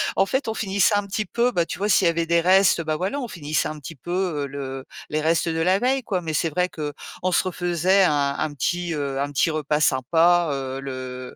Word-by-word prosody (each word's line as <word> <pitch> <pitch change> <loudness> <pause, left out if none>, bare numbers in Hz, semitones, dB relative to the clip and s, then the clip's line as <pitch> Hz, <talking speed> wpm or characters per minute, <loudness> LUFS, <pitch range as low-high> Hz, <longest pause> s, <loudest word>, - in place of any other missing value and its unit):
En 195 - +3
fait, 265 +6 -1
on 220 - -2
finissait 200 0 +2
un 205 0 0
petit 205 +2 -3
peu 235 +6 +1
bah, 175 -7 +1
tu - - -5
vois, 200 +3 -1
s'il 190 -3 +4
y - - +5
avait 170 0 0
des 170 0 +2
restes, 185 0 +4
bah, 155 -1 -2
voilà, 190 - -2
on 250 - -4
finissait 155 -7 -2
un 155 - -6
petit 155 +3 -9
peu, 155 +6 -9 0.3
heu, - - -6
le 135 -1 -6 0.2
les 155 0 -1
restes 165 +2 +1
de 160 0 -2
la 185 +3 +3
veille, 260 +5 +1
quoi. 190 -5 -2
Mais 160 -2 -4
c'est 165 +2 +1
vrai 180 +4 0
qu'on 155 +4 -5
se - - +3
refaisait 180 +1 +2
un 145 -5 +2
un 155 -1 -2
petit, 175 +5 -2
heu, 140 -3 -3
un 145 +1 -2
petit 145 +3 +2
repas 150 -1 -1
sympa, 165 +5 +3
heu, 135 -1 -4
le 130 -1 -7
165 Hz, 245 wpm, -23 LUFS, 145-185 Hz, 0.3 s, y